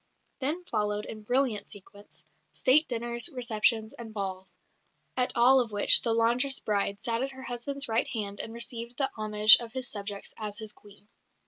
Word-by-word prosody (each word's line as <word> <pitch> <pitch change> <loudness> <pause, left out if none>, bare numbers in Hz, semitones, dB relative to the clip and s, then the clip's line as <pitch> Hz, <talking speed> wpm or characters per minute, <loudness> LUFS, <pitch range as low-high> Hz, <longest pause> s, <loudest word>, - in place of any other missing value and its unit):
Then 300 +7 -3
followed, 210 -6 -2
in 215 - -8
brilliant 240 -2 -1
sequence, 205 +1 -13 0.3
State 295 +4 +4
dinners, 235 +3 +3
receptions, 225 -4 0
and 230 -2 -10
balls, 190 -3 -5 0.6
at 250 -1 +1
all 255 +3 +6
of 235 -3 -1
which 205 -1 +5
the 230 - 0
laundress 240 +4 +2
bride 200 -1 -2
sat 230 0 -1
at 270 +1 -3
her 265 0 -11
husband's 260 +3 -4
right 225 +1 0
hand 205 -3 -5
and 225 - -5
received 235 0 -4
the 270 -2 -1
homage 215 0 +6
of 235 -1 -9
his 260 -2 -1
subjects 205 -2 -6
as 210 -2 -5
his 215 -1 -5
Queen. 205 0 -19
230 Hz, 175 wpm, -28 LUFS, 210-250 Hz, 0.6 s, all